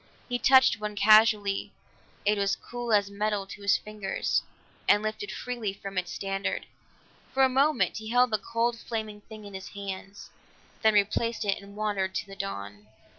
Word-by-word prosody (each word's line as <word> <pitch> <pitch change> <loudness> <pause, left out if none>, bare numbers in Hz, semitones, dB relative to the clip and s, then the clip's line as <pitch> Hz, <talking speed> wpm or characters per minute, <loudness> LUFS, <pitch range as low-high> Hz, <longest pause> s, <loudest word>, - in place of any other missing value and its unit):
He 245 -1 -1
touched 260 -1 +6
one 210 0 -4
casually; 210 -1 +4 0.5
it 210 +1 +4
was 200 -1 +1
cool 240 -1 -6
as 200 -1 +3
metal 205 0 -1
to 200 +1 -10
his 200 0 +3
fingers, 210 -2 -2 0.5
and 205 - +5
lifted 215 -1 -3
freely 235 -5 -3
from 195 0 -8
its 180 -1 -2
standard. 195 0 -3 0.7
For 270 - +3
a - - +7
moment 275 +1 +2
he 220 0 -6
held 245 +1 +4
the 215 - +1
cold 230 +2 -1
flaming 215 -3 -5
thing 215 -1 -11
in 200 - -10
his 190 0 -7
hands, 195 0 -7 0.5
then 220 -2 +4
replaced 215 +3 +1
it 200 -1 0
and 200 0 -13
wandered 205 -3 -1
into - - -3
the 195 -1 -11
dawn. 100 - -6
210 Hz, 175 wpm, -28 LUFS, 200-225 Hz, 0.7 s, a